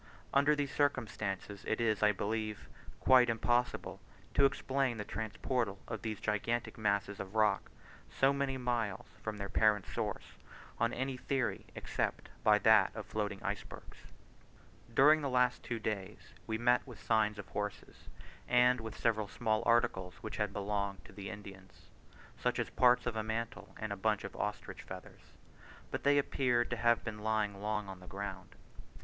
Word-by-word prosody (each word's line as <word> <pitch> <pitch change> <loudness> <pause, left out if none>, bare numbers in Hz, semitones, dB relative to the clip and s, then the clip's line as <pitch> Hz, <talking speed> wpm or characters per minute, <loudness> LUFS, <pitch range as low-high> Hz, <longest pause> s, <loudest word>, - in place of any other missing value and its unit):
Under 145 +2 +5
these 145 -1 -2
circumstances 105 -8 -1
it 110 - 0
is, 110 -3 +1
I 105 0 +6
believe, 110 +1 -3 0.3
quite 125 -2 +6
impossible 120 +2 0 0.3
to 140 - +5
explain 135 -2 +1
the 105 - -4
transportal 110 +1 -2
of - - -4
these 110 -2 -3
gigantic 110 +3 -1
masses 100 -2 0
of 100 +2 -7
rock 105 -2 +2 0.4
so 135 +1 +3
many 140 -1 -1
miles 120 -6 -1 0.2
from 110 -1 -4
their 100 -1 -4
parent 105 -1 +3
source, - - -3 0.6
on 115 +1 +2
any 130 +1 -2
theory 135 0 -1
except - - -2
by 105 -1 +6
that 105 -2 +5
of 110 -2 -5
floating 105 -2 -3
icebergs. - - -5 0.9
During 150 +6 +6
the 140 - -1
two 130 - -3
last 125 0 +2
days 105 -1 -4
we 110 -1 -1
met 120 +1 +4
with 120 -4 -10
signs 110 -2 +2
of 105 - -8
horses, 105 -1 -5 0.4
and 125 0 +4
with 110 -1 -7
several 110 -3 +1
small 110 0 0
articles 95 -6 +2
which 110 - -5
had 105 -2 0
belonged 100 -1 -2
to - - -13
the 100 -1 -6
Indians 95 -2 -11 0.5
such - - 0
as - - -2
parts 125 0 +4
of 120 -2 -1
a 110 - 0
mantle 110 +2 -4
and 110 -2 -3
a - - -4
bunch 105 +1 0
of 100 - -7
ostrich 105 0 -4
feathers, - - -11 0.6
but - - -2
they 145 0 +5
appeared 125 -4 +2
to 125 - -1
have 120 +1 +3
been 110 -2 -5
lying 105 -2 0
long 105 -1 -1
on 95 -1 -8
the 90 - -13
ground. 95 -1 -6
110 Hz, 165 wpm, -34 LUFS, 105-125 Hz, 0.9 s, I